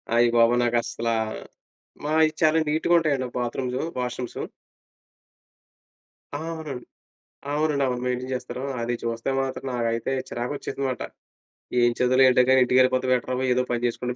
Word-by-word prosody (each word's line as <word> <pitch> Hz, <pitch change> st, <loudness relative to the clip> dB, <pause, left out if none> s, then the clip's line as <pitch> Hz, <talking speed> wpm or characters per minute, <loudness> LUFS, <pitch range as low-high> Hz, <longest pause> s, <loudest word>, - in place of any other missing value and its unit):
అయ్య 120 Hz, 0 st, +5 dB
బాబో! 115 Hz, +1 st, +5 dB
నాకస్సలా, 115 Hz, -1 st, 0 dB, 0.9 s
మాయి 155 Hz, +1 st, +3 dB
చాలా 160 Hz, 0 st, +4 dB
నీట్‌గా 160 Hz, +3 st, +1 dB
ఉంటాయండి. 140 Hz, -5 st, 0 dB
Bathrooms, 125 Hz, +1 st, -2 dB, 0.2 s
washrooms. 125 Hz, 0 st, -4 dB, 2.0 s
ఆ! -, -, -1 dB, 0.2 s
అవునండి. 150 Hz, -6 st, -7 dB, 0.7 s
అవునండి, 150 Hz, -2 st, +1 dB
అవును. 125 Hz, -1 st, -2 dB
మెయింటైన్ 125 Hz, +1 st, -2 dB
చేస్తారు. 125 Hz, +1 st, -6 dB, 0.2 s
అది 120 Hz, +1 st, -1 dB
చూస్తే 115 Hz, +1 st, -2 dB
మాత్రం 135 Hz, 0 st, -4 dB
నాకైతే, 115 Hz, +1 st, -1 dB, 0.2 s
చిరాకు 120 Hz, +3 st, -3 dB
వచ్చేసిందిమాట. 135 Hz, -2 st, -3 dB, 0.8 s
ఏం 120 Hz, -, +5 dB
చదువులే 130 Hz, +1 st, +5 dB
ఏంటో 125 Hz, 0 st, +5 dB
కానీ, 130 Hz, -, +6 dB
ఇంటికెళ్ళిపోతే, 130 Hz, 0 st, +3 dB
బెటర్‌ 125 Hz, 0 st, -1 dB
బాబు, 130 Hz, +1 st, -1 dB
ఏదో 125 Hz, +1 st, +1 dB
పని 120 Hz, 0 st, 0 dB
చేసుకుంటే 125 Hz, +1 st, -3 dB
125 Hz, 130 wpm, -25 LUFS, 120-135 Hz, 2.0 s, కానీ